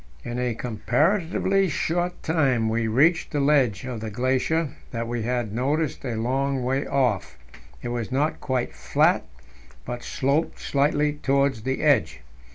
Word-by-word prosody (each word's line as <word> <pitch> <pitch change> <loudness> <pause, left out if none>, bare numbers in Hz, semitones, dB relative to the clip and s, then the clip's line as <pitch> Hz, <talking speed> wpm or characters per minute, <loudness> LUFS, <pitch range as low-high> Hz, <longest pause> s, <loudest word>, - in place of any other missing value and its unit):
In 120 0 -4
a 125 -2 -1
comparatively 165 - +1
short 175 +3 -1
time 135 -8 +2
we 115 0 0
reached 150 +10 +3
the 145 - -1
ledge 135 -8 +2
in 125 -3 -4
the 110 0 -5
glacier 130 +7 0 0.2
that 115 -1 -4
we 120 0 -2
had 120 -2 -2
noticed 145 +6 -1
a 120 -4 -3
long 130 +3 0
way 135 +3 0
off; 105 - 0 0.5
it 120 - -3
was 120 0 -3
not 145 +4 0
quite 130 -3 -1
flat, - - +2 0.6
but 120 0 -5
sloped 140 +7 0
slightly 145 +1 +1
towards 140 -3 +1
the 130 +5 -2
edge. 80 - +2
130 Hz, 150 wpm, -25 LUFS, 120-150 Hz, 0.6 s, reached